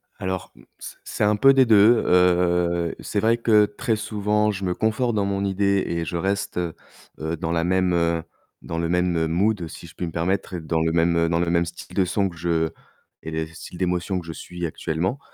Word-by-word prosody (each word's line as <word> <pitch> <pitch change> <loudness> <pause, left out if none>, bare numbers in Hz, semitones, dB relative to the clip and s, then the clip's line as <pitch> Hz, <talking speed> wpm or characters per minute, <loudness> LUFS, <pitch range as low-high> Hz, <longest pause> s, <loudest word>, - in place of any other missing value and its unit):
Alors, 95 -1 -4
mmh, - - -18 0.2
c - - -9
c'est - - -3
un 105 0 +3
peu 135 +6 +6
des 135 -1 +5
2, 110 +1 +5
heu, 90 -1 +2
c'est 105 - -2
vrai 115 +3 +3
que 110 -3 +4
très 110 +3 -2
souvent, 105 0 0
je 100 -1 -6
me 90 - 0
conforte 110 +3 0
dans 100 -2 +1
mon 100 0 -1
idée 100 0 +1
et 85 -1 -2
je 85 - -4
reste, 100 +3 -2
heu 85 -2 -2 0.5
heu, 80 +1 -3
dans 80 +1 -3
la 85 -1 +1
même, 95 0 +1
heu, 85 -1 +1 0.4
dans 80 - -5
le 85 0 -1
même, 90 0 +1
heu, 80 0 +1
mood 95 +2 0
si - - -10
je - - -16
puis 90 - -3
me 80 - -6
permettre, 95 +3 -1
dans 80 0 -1
le 80 0 +1
même 85 0 +2
dans 85 0 +1
le 85 0 0
même 85 0 +2
style 85 +1 -10
de 95 - +3
son 95 +2 0
que 85 - -13
je 85 -1 0 0.5
et 80 - -6
le 80 0 -2
style 80 +2 -11
d'émotion 90 +1 -1
que 85 - -10
je 80 - -6
suis 90 +1 -6
actuellement, 85 - -2
90 Hz, 225 wpm, -23 LUFS, 85-100 Hz, 0.5 s, peu